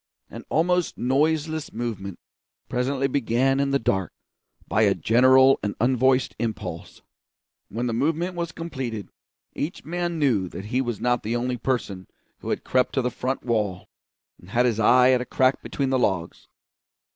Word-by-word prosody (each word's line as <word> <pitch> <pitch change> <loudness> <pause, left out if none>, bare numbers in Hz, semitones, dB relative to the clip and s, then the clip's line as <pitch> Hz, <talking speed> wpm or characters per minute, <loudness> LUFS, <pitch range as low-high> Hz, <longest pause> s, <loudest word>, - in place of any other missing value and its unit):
An - - -8
almost 180 +2 +1
noiseless 155 +4 0
movement 105 -5 -5 0.5
presently 130 +2 -1
began 135 0 +1
in 140 0 +1
the 140 - +2
dark, 95 -7 -1 0.6
by 110 - +1
a 100 -3 +4
general 130 - +5
and 105 -1 -3
unvoiced 130 +2 +2
impulse. 95 -7 -5 0.7
When 120 +4 -3
the 120 - -1
movement 160 +9 0
was 170 -1 -3
completed, 130 -11 -5 0.4
each 160 +5 -5
man 175 0 -2
knew 115 - +1
that 95 - -8
he 125 +4 0
was 120 -4 -3
not 125 0 +1
the 115 +3 -2
only 125 +1 -1
person 110 -6 -3 0.3
who - - -7
had - - -2
crept 125 0 +1
to 130 - +1
the 125 - -1
front 130 +3 -3
wall 105 -6 -2 0.5
and 90 - -16
had 120 +4 +2
his 115 -3 +1
eye 125 +3 +5
at 125 -1 +3
a - - -1
crack 130 +1 +1
between 135 -2 -2
the 130 - +2
logs. 90 -7 -2
125 Hz, 165 wpm, -24 LUFS, 110-140 Hz, 0.7 s, general